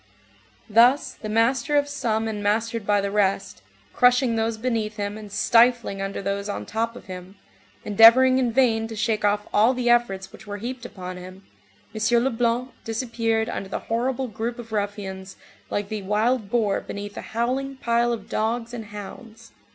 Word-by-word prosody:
Thus, 240 +6 +4
the 215 - -8
master 240 +6 +2
of 285 0 +2
some 225 -6 -1
and 210 -2 -4
mastered 225 +1 -1
by 205 -1 +3
the 200 0 -2
rest, 195 - 0 0.3
crushing 250 -1 +4
those 225 0 -1
beneath 220 -2 -2
him 205 0 -3
and 215 -2 -10
stifling 230 -1 +3
under 195 0 -4
those 200 +1 -2
on 205 - -4
top 230 +2 -2
of - - -11
him, 185 0 -9 0.5
endeavoring 235 +5 +7
in 245 -2 +1
vain 225 -3 +2
to 225 - -7
shake 215 0 0
off 205 0 +1
all 225 +5 +4
the 245 -1 +2
efforts 195 -6 +1
which 220 - -14
were 205 0 -5
heaped 240 +3 -6
upon 185 -3 -8
him, 185 +2 -11 0.5
M. 230 +2 +2
Leblanc 245 0 0
disappeared 225 -1 -1
under 195 - -5
the - - -2
horrible 255 +3 -2
group 230 +2 -4
of 230 -2 -10
ruffians 200 -2 -4 0.3
like 205 -1 -2
the 215 -2 -4
wild 210 +3 0
boar 220 -4 +1
beneath 205 0 -7
a - - -5
howling 260 +4 -2
pile 235 -1 +1
of 225 -4 -4
dogs 230 +2 -2
and 225 -2 -6
hounds. 215 +2 -10
225 Hz, 175 wpm, -24 LUFS, 205-240 Hz, 0.5 s, endeavoring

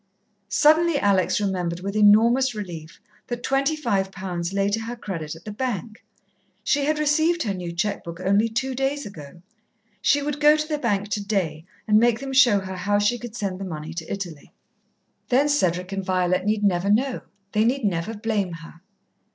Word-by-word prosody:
Suddenly 310 +8 +4
Alex 200 -6 +2
remembered 180 -4 -2
with 200 +2 -4
enormous 230 +5 +5
relief 170 -6 -7 0.3
that 240 0 -5
twenty 275 +3 +1
five 200 -10 -1
pounds 180 -3 -4
lay 195 0 +1
to 205 +2 0
her 230 +2 -5
credit 165 -9 -5
at 165 - -15
the 210 - -5
bank. 220 -2 -4 0.6
She 285 -1 +1
had 305 +1 +1
received 315 +3 +2
her 205 -4 -1
new 180 -2 -5
cheque 180 +5 -2
book 170 0 -8
only 200 +4 +2
two 260 +4 -2
days 270 +3 -1
ago. 170 -3 -11 0.6
She 285 0 +3
would 295 0 -3
go 300 +1 +6
to 305 0 -2
the 305 -2 -2
bank 205 -5 -1
today 195 -7 -2 0.2
and 210 0 +5
make 235 0 +3
them 270 0 -5
show 255 -5 +6
her 190 0 -6
how 205 +3 +1
she 205 +4 +1
could 240 -1 -8
send 195 -5 -3
the - - -5
money 160 -3 -6
to 165 -1 -6
Italy. 175 -7 -6 0.8
Then 265 +4 +3
Cedric 185 - 0
and 195 0 -3
Violet 185 0 0
need 210 0 0
never 190 -1 +2
know. 250 +5 +1 0.3
They 215 - +2
need 250 +1 +1
never 190 +3 -1
blame 205 -4 -1
her. 165 0 -11
205 Hz, 185 wpm, -24 LUFS, 185-250 Hz, 0.8 s, go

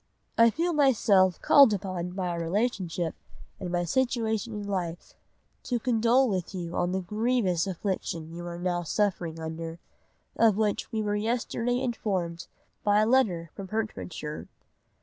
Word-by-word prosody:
"I 230 0 +6
feel 335 +8 -1
myself 210 - +4
called 275 -6 +7
upon 185 -3 -4
by 185 -1 -2
our 170 -1 -2
relationship 175 -2 -1 0.5
and 180 - -4
my 175 0 +1
situation 230 +2 0
in 205 -1 -5
life, 175 -4 -4 0.5
to 245 - 0
condole 240 +2 +3
with 190 -2 -2
you 170 -2 -5
on 175 - 0
the 190 +1 -1
grievous 210 -3 0
affliction 170 -3 -3
you 175 +1 -7
are 170 0 -5
now 175 0 -1
suffering 175 -2 -1
under, 165 +1 -5 0.6
of 220 -3 +4
which 215 -2 0
we 220 -1 -1
were 205 0 0
yesterday 235 +2 -1
informed 190 -9 -2 0.4
by 205 0 +4
a - - +3
letter 195 -10 +2
from 195 - -7
Hertfordshire. 185 -7 -4
195 Hz, 150 wpm, -28 LUFS, 175-230 Hz, 0.6 s, called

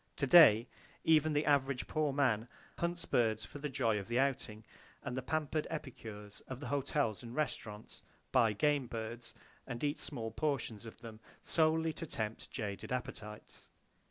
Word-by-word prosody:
To 140 - 0
day, 125 -7 +8 0.4
even 155 -1 +4
the 150 +1 +1
average 140 -3 +2
poor 155 -2 0
man 125 -5 +2 0.3
hunts 170 0 -1
birds 110 -3 +1
for 145 - -9
the 150 +1 -3
joy 115 -5 +1
of 100 - -7
the 120 +1 0
outing, 130 -5 0 0.4
and 125 -3 -4
the 130 - -1
pampered 155 +2 -1
epicures 110 -9 -7
of 130 -1 -6
the 145 - -6
hotels 140 -5 0
and 120 0 -8
restaurants 110 -8 -4 0.3
buy 115 -4 +4
game 145 +4 +2
birds, 115 +1 -6 0.3
and 120 -1 -5
eat 145 +1 0
small 115 -6 -4
portions 120 -8 -2
of 115 - -12
them, 115 -2 -9 0.2
solely 160 0 +2
to 165 - -6
tempt 110 -5 -4
jaded 100 0 -5
appetites. 105 -4 -6
125 Hz, 160 wpm, -34 LUFS, 110-150 Hz, 0.4 s, day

